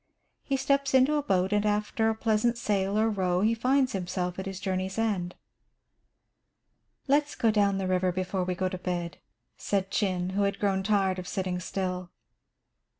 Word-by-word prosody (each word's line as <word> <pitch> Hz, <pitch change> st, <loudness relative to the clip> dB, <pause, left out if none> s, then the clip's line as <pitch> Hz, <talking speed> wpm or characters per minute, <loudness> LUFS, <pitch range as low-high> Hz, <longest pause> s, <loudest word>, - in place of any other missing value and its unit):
He 275 Hz, -, -1 dB
steps 275 Hz, 0 st, +1 dB
into 260 Hz, +3 st, +5 dB
a 300 Hz, -, +2 dB
boat, 190 Hz, -6 st, +1 dB
and 205 Hz, 0 st, +2 dB
after 210 Hz, +1 st, +1 dB
a 220 Hz, -, 0 dB
pleasant 225 Hz, +1 st, +1 dB
sail 200 Hz, -3 st, 0 dB
or 220 Hz, +1 st, +3 dB
row, 185 Hz, -4 st, 0 dB
he 220 Hz, +3 st, +3 dB
finds 260 Hz, +3 st, +2 dB
himself 180 Hz, -1 st, -3 dB
at 190 Hz, -, -4 dB
his 190 Hz, -1 st, -5 dB
journey's 190 Hz, 0 st, -2 dB
end. 195 Hz, -6 st, -1 dB, 1.7 s
"Let's 290 Hz, +2 st, +2 dB
go 225 Hz, -, +2 dB
down 200 Hz, -2 st, +2 dB
the 195 Hz, -, -2 dB
river 185 Hz, 0 st, +1 dB
before 185 Hz, +1 st, -2 dB
we 180 Hz, 0 st, -2 dB
go 185 Hz, +1 st, 0 dB
to 185 Hz, -1 st, -5 dB
bed," 175 Hz, -2 st, -4 dB, 0.4 s
said 195 Hz, -1 st, -1 dB
Chin, 185 Hz, -3 st, 0 dB
who 200 Hz, +2 st, 0 dB
had 200 Hz, 0 st, +1 dB
grown 195 Hz, -2 st, +1 dB
tired 190 Hz, -2 st, +1 dB
of 180 Hz, -, -7 dB
sitting 185 Hz, -2 st, -2 dB
still. 185 Hz, -1 st, -3 dB
195 Hz, 175 wpm, -28 LUFS, 185-220 Hz, 1.7 s, into